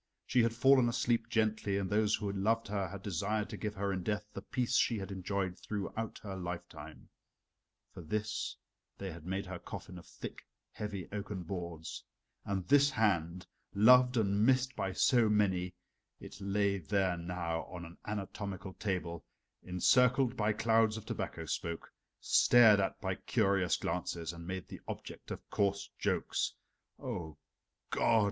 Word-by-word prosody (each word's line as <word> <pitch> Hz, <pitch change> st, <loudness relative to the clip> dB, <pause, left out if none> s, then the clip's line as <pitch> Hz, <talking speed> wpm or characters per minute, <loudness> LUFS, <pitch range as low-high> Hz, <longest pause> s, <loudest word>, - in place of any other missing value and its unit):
She 125 Hz, -, +3 dB
had 115 Hz, 0 st, +1 dB
fallen 130 Hz, 0 st, +5 dB
asleep 115 Hz, -1 st, +1 dB
gently, 110 Hz, -3 st, +1 dB
and 100 Hz, -1 st, -1 dB
those 105 Hz, +2 st, +3 dB
who 105 Hz, -2 st, -3 dB
loved 110 Hz, +4 st, +1 dB
her 100 Hz, -2 st, -1 dB
had 95 Hz, +2 st, -8 dB
desired 105 Hz, +3 st, -1 dB
to -, -, -4 dB
give 105 Hz, -1 st, -4 dB
her 100 Hz, 0 st, -1 dB
in 95 Hz, -, -2 dB
death 105 Hz, +3 st, -2 dB
the -, -, -5 dB
peace 125 Hz, -4 st, -1 dB
she 115 Hz, -, +3 dB
had 100 Hz, 0 st, -5 dB
enjoyed 95 Hz, -1 st, -2 dB
throughout 105 Hz, +2 st, -4 dB
her 100 Hz, -2 st, -5 dB
lifetime. 90 Hz, -1 st, -7 dB, 0.8 s
For -, -, -8 dB
this 105 Hz, +6 st, -2 dB, 0.4 s
they 95 Hz, -1 st, -5 dB
had 85 Hz, 0 st, -10 dB
made 95 Hz, +1 st, -2 dB
her 90 Hz, -1 st, -6 dB
coffin 90 Hz, +1 st, -8 dB
of -, -, -15 dB
thick, -, -, -8 dB, 0.3 s
heavy 100 Hz, -4 st, -5 dB
oaken 100 Hz, -2 st, -4 dB
boards. 85 Hz, -3 st, -6 dB, 0.4 s
And 95 Hz, -3 st, -2 dB
this 140 Hz, +1 st, +6 dB
hand, 90 Hz, -, +1 dB, 0.3 s
loved 125 Hz, +4 st, +7 dB
and 100 Hz, -1 st, +2 dB
missed 130 Hz, +2 st, +3 dB
by 95 Hz, -, -2 dB
so 120 Hz, -1 st, +4 dB
many 95 Hz, -4 st, +1 dB, 0.4 s
it -, -, -11 dB
lay 100 Hz, 0 st, +1 dB
there 95 Hz, +1 st, +1 dB
now 85 Hz, -1 st, -3 dB
on 90 Hz, -2 st, -8 dB
an 85 Hz, +1 st, -13 dB
anatomical 100 Hz, -2 st, -4 dB
table, 90 Hz, -6 st, -3 dB, 0.4 s
encircled 125 Hz, +8 st, +3 dB
by 110 Hz, -2 st, +1 dB
clouds 110 Hz, 0 st, +3 dB
of 110 Hz, -, -8 dB
tobacco 80 Hz, -, -4 dB
smoke, 85 Hz, +1 st, -4 dB, 0.3 s
stared 115 Hz, -4 st, +6 dB
at 95 Hz, -, -1 dB
by -, -, 0 dB
curious 95 Hz, -2 st, +1 dB
glances, 85 Hz, -1 st, -3 dB
and 85 Hz, 0 st, -9 dB
made 95 Hz, -1 st, -4 dB
the -, -, -9 dB
object -, -, -7 dB
of -, -, -7 dB
coarse 100 Hz, -1 st, 0 dB
jokes. -, -, 0 dB, 0.4 s
O 80 Hz, -4 st, -5 dB, 0.5 s
God! 115 Hz, -1 st, +4 dB
100 Hz, 155 wpm, -33 LUFS, 90-110 Hz, 0.8 s, loved